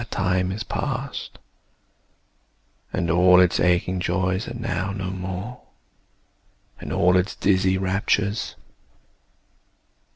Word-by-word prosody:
That 115 - -8
time 90 -1 0
is 105 +3 -4
past, 135 +3 -4 1.5
And 85 -2 -1
all 90 +1 +6
its 90 -1 +3
aching 90 +1 +2
joys 95 +2 -1
are - - -6
now 100 -5 -2
no 95 -2 -4
more, 95 +6 -6 1.2
And - - -7
all 90 +1 +3
its 90 +3 +1
dizzy 95 -1 +2
raptures. 100 +2 0
95 Hz, 105 wpm, -23 LUFS, 90-100 Hz, 1.5 s, all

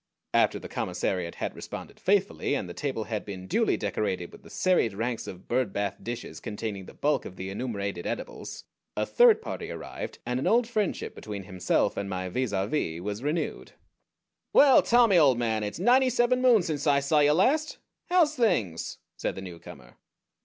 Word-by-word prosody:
After - - +3
the - - -8
commissariat 90 -3 -2
had - - -4
responded - - -8
faithfully, 195 -6 +1
and 100 - -3
the 85 - -7
table 135 -3 -3
had 110 -2 -4
been 95 -2 -7
duly 95 - +1
decorated 90 -5 -2
with - - -14
the - - -15
serried 180 - +1
ranks 115 +2 -3
of 90 0 -9
"bird 125 -4 0
bath" 100 -1 -2
dishes 120 0 -6
containing 105 -3 -5
the - - -12
bulk 150 +1 +1
of 95 - -9
the 95 +1 -6
enumerated 100 -5 -3
edibles, - - -6 0.3
a - - +1
third 465 -2 +5
party - - -5
arrived, - - -6
and 125 +1 -1
an - - -1
old 235 0 +3
friendship 215 -5 -2
between 100 -2 -7
himself 95 -1 0
and 100 0 -3
my 95 -1 -3
vis 125 +4 -1
à 95 0 0
vis 85 - -1
was 105 +4 -4
renewed. 150 +5 -3 0.8
"Well, 280 -2 +7
Tommy, 235 -6 +5
old 135 -6 +5
man, 110 -2 0
it's 105 0 -4
ninety 255 +7 +4
seven 250 +1 +2
moons 235 -8 +5
since 150 -2 -2
I 140 -1 +5
saw 140 +2 +2
you 145 0 +5
last! 280 - +2 0.3
How's 340 -4 +4
things?" 120 - 0 0.2
said - - -2
the 95 - -6
newcomer. 85 -9 -11
120 Hz, 185 wpm, -27 LUFS, -, 0.8 s, Well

